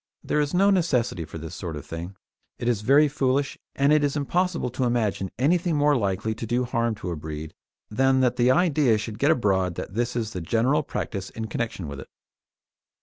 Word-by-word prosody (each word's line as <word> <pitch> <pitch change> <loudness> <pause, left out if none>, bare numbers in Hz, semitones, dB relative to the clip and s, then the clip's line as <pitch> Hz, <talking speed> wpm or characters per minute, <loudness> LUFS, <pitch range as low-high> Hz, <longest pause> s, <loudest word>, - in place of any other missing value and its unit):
There 150 - 0
is 145 -1 0
no 195 +3 +4
necessity 125 - +1
for 80 - -9
this 80 0 -7
sort 85 -4 -5
of 75 - -8
thing; 85 +4 -7 0.4
it 120 - -4
is 115 -4 +1
very 140 +7 +5
foolish, 135 0 0 0.2
and 140 +2 +3
it 150 -1 +4
is 145 +1 0
impossible 170 -1 0
to 130 - -2
imagine 110 -5 0
anything 170 - +2
more 145 0 +3
likely 110 -1 -1
to 115 +1 -6
do 120 +3 +1
harm 115 -2 0
to 95 -4 -5
a - - -2
breed 75 0 -7 0.4
than 135 +3 +3
that 125 -1 +2
the 125 0 +3
idea 145 -6 +3
should 110 0 -6
get 145 - +3
abroad 95 - +2
that 95 - -6
this 120 +2 -1
is 115 -2 -2
the 90 - -4
general 120 - +2
practice 95 -8 -4
in 110 - -5
connection 110 -5 -4
with 70 -1 -7
it. - - -10
120 Hz, 205 wpm, -25 LUFS, 100-145 Hz, 0.4 s, very